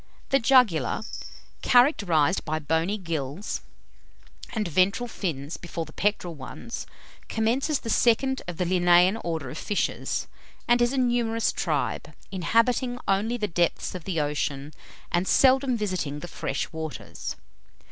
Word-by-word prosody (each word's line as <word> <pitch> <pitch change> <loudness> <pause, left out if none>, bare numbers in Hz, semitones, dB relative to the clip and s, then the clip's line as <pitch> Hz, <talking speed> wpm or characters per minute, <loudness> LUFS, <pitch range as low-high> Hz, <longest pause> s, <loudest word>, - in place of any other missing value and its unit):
The 275 - +4
Jugular, 225 - +3 0.6
characterized 195 - +4
by 155 0 -2
bony 160 +6 0
gills, 165 0 -4 0.9
and 220 -4 -1
ventral 185 - +2
fins 160 - -4
before 170 -1 -5
the 155 - -14
pectoral 200 -4 0
ones, 150 - -7 0.4
commences 255 +7 +1
the 230 - -5
second 265 +3 +3
of 175 -2 -5
the 180 - 0
Linnaean 175 +2 +4
orders 160 -5 -4
of - - -7
fishes, 205 - -1 0.4
and 240 0 +4
is 240 0 +3
a 275 - -2
numerous 240 -3 +1
tribe, - - -2 0.2
inhabiting 230 +6 +1
only 210 +5 +1
the 210 -3 -1
depths 170 -2 0
of 180 -3 -7
the 180 -4 -1
ocean, 145 -1 -2 0.4
and 175 +2 +1
seldom 265 -1 +4
visiting 180 -9 -2
the 175 - -6
fresh 140 -4 -3
waters. 160 -4 -6
185 Hz, 135 wpm, -26 LUFS, 160-235 Hz, 0.9 s, The